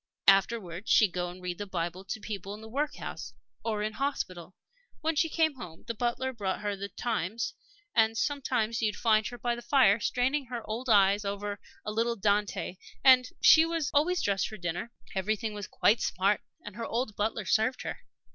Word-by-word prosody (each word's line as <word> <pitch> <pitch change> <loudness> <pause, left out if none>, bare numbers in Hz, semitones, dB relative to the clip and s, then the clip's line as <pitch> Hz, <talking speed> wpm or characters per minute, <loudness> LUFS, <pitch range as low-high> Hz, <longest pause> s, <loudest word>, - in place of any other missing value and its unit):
Afterwards 195 -1 +3
she'd 210 -4 +5
go 175 0 -2
and 180 +1 -11
read 180 0 -4
the 205 - -4
Bible 175 0 -3
to 195 +3 -4
people 200 -2 -6
in 215 - -12
the 220 - -9
workhouse 225 - -4 0.3
or 215 -2 -1
in 215 0 -2
hospital. 185 - -3 0.5
When 320 0 0
she 325 +2 +2
came 315 -3 +1
home, 170 -9 -10
the 230 - -3
butler 245 +3 -1
brought 200 -5 -3
her 205 -1 -1
the 200 +1 -6
Times; 225 -1 -2 0.4
and 225 0 +3
sometimes 245 -5 0
you'd 210 -2 +1
find 215 -1 +3
her 245 - -7
by 240 0 -1
the 240 - -6
fire, 240 -6 +4
straining 260 +5 0
her 240 -1 -6
old 235 +4 -4
eyes 200 -1 +5
over 200 0 -3 0.3
'a 210 - -2
little 230 +2 0
Dante.' 205 -2 0 0.3
And 255 -1 +7
she 320 - +8 0.3
always 340 +5 +2
dressed 195 -2 +1
for 215 - -8
dinner 175 +5 -4 0.2
everything 210 +3 -1
was 205 -2 -6
quite 225 - +3
smart 195 +3 +1 0.2
and 205 - -8
her 230 - -3
old 230 -2 -2
butler 215 0 -1
served 220 +7 +1
her. - - -5
215 Hz, 185 wpm, -29 LUFS, 195-240 Hz, 0.5 s, she